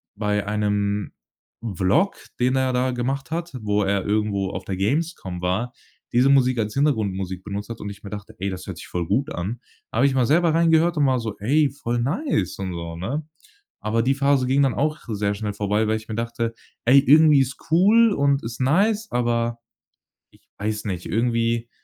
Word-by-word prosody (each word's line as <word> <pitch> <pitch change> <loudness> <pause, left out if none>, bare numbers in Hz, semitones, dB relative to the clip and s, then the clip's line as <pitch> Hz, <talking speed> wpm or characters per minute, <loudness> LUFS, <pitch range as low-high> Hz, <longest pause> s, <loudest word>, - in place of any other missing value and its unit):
bei 105 -1 -1
einem 105 -1 -1 0.6
Vlog, 145 - +2 0.2
den 125 +1 +2
er 130 -1 +1
da 125 +1 +1
gemacht 130 +4 -3
hat, 170 +1 -3
wo 105 0 +1
er 100 -1 0
irgendwo 100 -2 0
auf 95 -1 -6
der 95 -1 -4
Gamescom 105 - -2
war, 100 +8 -1 0.4
diese 125 +3 +4
Musik 130 -3 +4
als 105 -1 -1
Hintergrundmusik 95 -10 0
benutzt 100 +2 -5
hat 115 - -6
und 105 - -5
ich 100 0 -11
mir 100 - -7
dachte: 105 -1 -8
„Ey, 95 +1 -1
das 95 0 -7
hört - - -6
sich - - -10
voll 90 -1 -3
gut 135 - 0
an.“ 110 +8 -4 0.3
Da - - -4
habe 130 - +4
ich 135 - 0
mal 130 -2 +3
selber 165 +2 +3
reingehört 165 0 +3
und 145 - +3
war 130 -1 +2
so: 110 -3 -4
„Ey, 145 +8 +2
voll 120 -4 -2
nice“ 140 - -1
und 95 -2 -3
so, 85 -1 -6
ne? 130 - -3 0.6
Aber 110 +2 0
die 135 +3 +2
Phase 140 -1 +2
ging 135 +2 +3
dann 135 - +3
auch 155 +2 0
sehr 105 -2 -1
schnell 105 0 -3
vorbei, 105 +2 0
weil 110 - +2
ich 110 0 -9
mir 110 - -4
dachte: 115 0 -2 0.3
„Ey, 135 +3 +7
irgendwie 150 +1 +6
ist 135 0 -1
cool 210 +7 +5
und 140 -3 +2
ist 115 +1 -6
nice, 205 +11 +2
aber 120 -1 0 0.7
ich - - -24 0.2
weiß 105 +1 -3
nicht, 90 -4 -4
irgendwie 115 0 0
115 Hz, 200 wpm, -23 LUFS, 105-140 Hz, 0.7 s, Ey